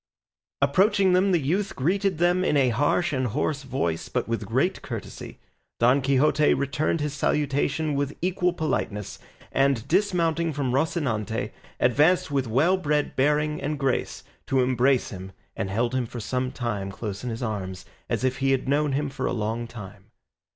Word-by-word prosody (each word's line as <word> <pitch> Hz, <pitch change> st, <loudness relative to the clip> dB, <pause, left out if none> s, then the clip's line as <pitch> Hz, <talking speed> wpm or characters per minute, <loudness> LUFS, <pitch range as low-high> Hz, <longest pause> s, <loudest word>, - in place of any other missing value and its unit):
Approaching 190 Hz, +6 st, +3 dB
them, 190 Hz, +2 st, +3 dB
the 175 Hz, -, +3 dB
youth 185 Hz, +8 st, -1 dB
greeted 185 Hz, +5 st, 0 dB
them 175 Hz, +2 st, +2 dB
in 150 Hz, -, +2 dB
a 130 Hz, -2 st, +4 dB
harsh 145 Hz, +8 st, +1 dB
and 130 Hz, -2 st, 0 dB
hoarse 145 Hz, +5 st, -1 dB
voice 130 Hz, -, -2 dB
but -, -, -2 dB
with -, -, -3 dB
great -, -, 0 dB
courtesy. -, -, -7 dB, 0.4 s
Don 125 Hz, +4 st, +4 dB
Quixote 140 Hz, +3 st, +3 dB
returned 140 Hz, +3 st, -1 dB
his 150 Hz, -1 st, -2 dB
salutation 150 Hz, +1 st, 0 dB
with 140 Hz, 0 st, -2 dB
equal 180 Hz, 0 st, +1 dB
politeness, 110 Hz, -, -3 dB, 0.3 s
and 135 Hz, -3 st, +1 dB
dismounting 170 Hz, -3 st, +1 dB
from 135 Hz, -3 st, -1 dB
Rocinante 115 Hz, -, -1 dB, 0.3 s
advanced 150 Hz, +7 st, +3 dB
with 135 Hz, -3 st, 0 dB
well 155 Hz, +12 st, +3 dB
bred 150 Hz, -4 st, -1 dB
bearing 150 Hz, +2 st, +1 dB
and 150 Hz, +1 st, -2 dB
grace 135 Hz, -2 st, -1 dB, 0.2 s
to 135 Hz, -1 st, +2 dB
embrace 130 Hz, +1 st, +2 dB
him, 95 Hz, -1 st, -8 dB, 0.2 s
and 95 Hz, -, -3 dB
held 120 Hz, +5 st, 0 dB
him 130 Hz, -2 st, 0 dB
for 120 Hz, -, -7 dB
some 125 Hz, +3 st, -2 dB
time 105 Hz, -6 st, -3 dB
close 100 Hz, 0 st, -6 dB
in 125 Hz, -, -3 dB
his 115 Hz, +2 st, -4 dB
arms 95 Hz, -5 st, -4 dB, 0.2 s
as -, -, -1 dB
if 130 Hz, 0 st, 0 dB
he 135 Hz, 0 st, +1 dB
had 135 Hz, -1 st, +1 dB
known 145 Hz, +1 st, +1 dB
him 145 Hz, +2 st, 0 dB
for 135 Hz, -1 st, -3 dB
a -, -, -1 dB
long 115 Hz, +1 st, -2 dB
time. 100 Hz, -4 st, -10 dB
140 Hz, 170 wpm, -25 LUFS, 120-155 Hz, 0.4 s, a